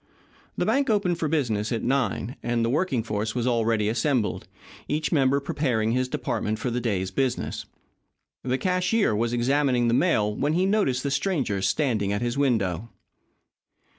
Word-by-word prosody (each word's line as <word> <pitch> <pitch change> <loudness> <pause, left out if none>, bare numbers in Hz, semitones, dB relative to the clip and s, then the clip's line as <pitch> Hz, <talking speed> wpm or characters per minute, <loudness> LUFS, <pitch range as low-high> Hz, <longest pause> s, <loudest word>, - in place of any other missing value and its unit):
The - - 0
bank 275 -1 +1
opened 185 -5 +1
for 160 - 0
business 120 -9 0
at 115 - -1
nine, 125 -2 -1
and 120 -1 0
the 115 - 0
working 140 -6 0
force 110 +1 -3
was 120 -1 -1
already 115 -3 +1
assembled, 115 0 0 0.4
each 150 +1 -1
member 140 -2 +3
preparing 125 -6 0
his 130 +1 +1
department 110 -5 -2
for 120 +2 -3
the 120 +1 -1
day's 95 -5 -1
business. 130 +4 -2 0.8
The 130 0 0
cashier 185 - +1
was 115 +2 0
examining 125 0 +2
the - - +2
mail 110 -9 +2
when 145 +6 0
he 180 +3 +2
noticed 190 -11 +1
the 140 - -1
stranger 135 - 0
standing 110 -5 0
at 100 +3 -1
his 120 0 -1
window. 115 - 0
125 Hz, 165 wpm, -25 LUFS, 110-145 Hz, 0.8 s, member